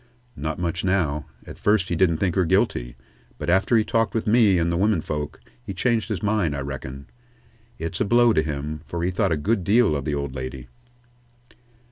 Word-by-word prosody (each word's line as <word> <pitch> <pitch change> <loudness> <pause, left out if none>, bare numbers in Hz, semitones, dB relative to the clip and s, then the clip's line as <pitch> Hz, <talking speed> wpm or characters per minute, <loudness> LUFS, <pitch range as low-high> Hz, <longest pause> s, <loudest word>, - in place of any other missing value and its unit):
"Not 75 +2 -3
much, 85 0 -2
now. 80 -6 0 0.2
At - - -11
first 105 -3 +2
he 85 - 0
didn't 85 -2 +3
think 90 0 0
her 95 - +2
guilty, - - 0 0.4
but - - -1
after 95 +6 +3
he 110 - +3
talked 115 +1 0
with 115 - 0
me 105 -4 +4
and 85 0 +1
the - - 0
women 100 0 +2
folks, 75 0 -4 0.2
he 80 +10 -7
changed 115 +3 0
his 100 -6 -3
mind, 100 -8 +1
I 70 - -3
reckon. 70 0 -6 0.7
It's 80 +8 -4
a - - +3
blow 120 +2 +4
to 80 - +3
him, 75 0 -4
for 85 +3 -3
he 90 - +1
thought 95 0 0
a 80 - +2
good 100 +6 0
deal 105 -2 +3
of 70 -2 -3
the 75 - -1
old 70 -2 -3
lady." 65 -1 -6
85 Hz, 205 wpm, -24 LUFS, 75-105 Hz, 0.7 s, me